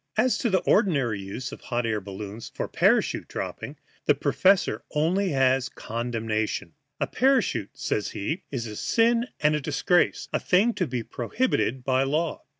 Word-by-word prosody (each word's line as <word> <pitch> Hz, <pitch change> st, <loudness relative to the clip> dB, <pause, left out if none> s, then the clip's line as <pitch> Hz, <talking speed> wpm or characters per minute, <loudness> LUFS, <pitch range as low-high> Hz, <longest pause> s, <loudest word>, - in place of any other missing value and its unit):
As 255 Hz, -, +3 dB
to 235 Hz, -, +1 dB
the 190 Hz, -2 st, +2 dB
ordinary 140 Hz, -, +2 dB
use 100 Hz, +7 st, -6 dB
of -, -, -9 dB
hot 120 Hz, -1 st, -2 dB
air 110 Hz, -2 st, -1 dB
balloons 100 Hz, +3 st, -7 dB
for -, -, -2 dB
parachute -, -, +2 dB
dropping, -, -, -5 dB, 0.3 s
the -, -, +5 dB
professor 195 Hz, 0 st, +3 dB, 0.2 s
has -, -, 0 dB
only 185 Hz, +6 st, +2 dB, 0.5 s
condemnation. 110 Hz, -6 st, -3 dB, 0.3 s
A -, -, +1 dB
parachute, 250 Hz, -, +1 dB
says 105 Hz, -, -1 dB
he, 155 Hz, -, -3 dB
is 125 Hz, -4 st, -3 dB
a 105 Hz, -2 st, -6 dB
sin 235 Hz, -, +2 dB
and 150 Hz, 0 st, +4 dB
a 150 Hz, -, 0 dB
disgrace 155 Hz, +5 st, +1 dB
a -, -, +2 dB
thing 205 Hz, +6 st, +3 dB
to 180 Hz, -, -1 dB
be 125 Hz, -3 st, -3 dB
prohibited 130 Hz, -, -1 dB
by 130 Hz, 0 st, +2 dB
law. 150 Hz, +4 st, 0 dB
135 Hz, 160 wpm, -26 LUFS, 115-185 Hz, 0.5 s, the